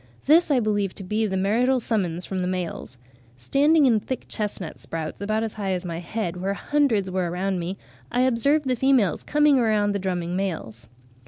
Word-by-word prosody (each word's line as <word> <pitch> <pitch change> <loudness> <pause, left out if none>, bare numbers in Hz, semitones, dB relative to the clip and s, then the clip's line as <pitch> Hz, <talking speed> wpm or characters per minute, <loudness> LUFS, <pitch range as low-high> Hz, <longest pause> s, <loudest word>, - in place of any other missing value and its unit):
This 320 +4 +5
I 275 -3 +3
believe 205 -4 0
to 195 - -8
be 215 +4 0
the 190 -1 -2
marital 240 +7 +2
summons 185 -7 -1
from 190 - -3
the 180 - -1
males. 180 -8 -4 0.4
Standing 290 - +3
in 230 -4 +4
thick 260 +5 -5
chestnut 200 -6 -4
sprouts 160 +2 -5
about 215 +2 0
as 225 - -3
high 195 -3 -2
as 180 0 -3
my 170 -1 -4
head, 180 0 -4
where 195 +2 -2
hundreds 230 -9 +1
were 185 -2 -1
around 185 +2 -1
me, 175 +3 -4 0.3
I 245 - +1
observed 270 +4 +2
the 255 - +2
females 250 - +2
coming 295 -2 +3
around 215 -3 +2
the 200 - -1
drumming 180 -2 -2
males." 155 - -4
200 Hz, 190 wpm, -24 LUFS, 180-245 Hz, 0.4 s, This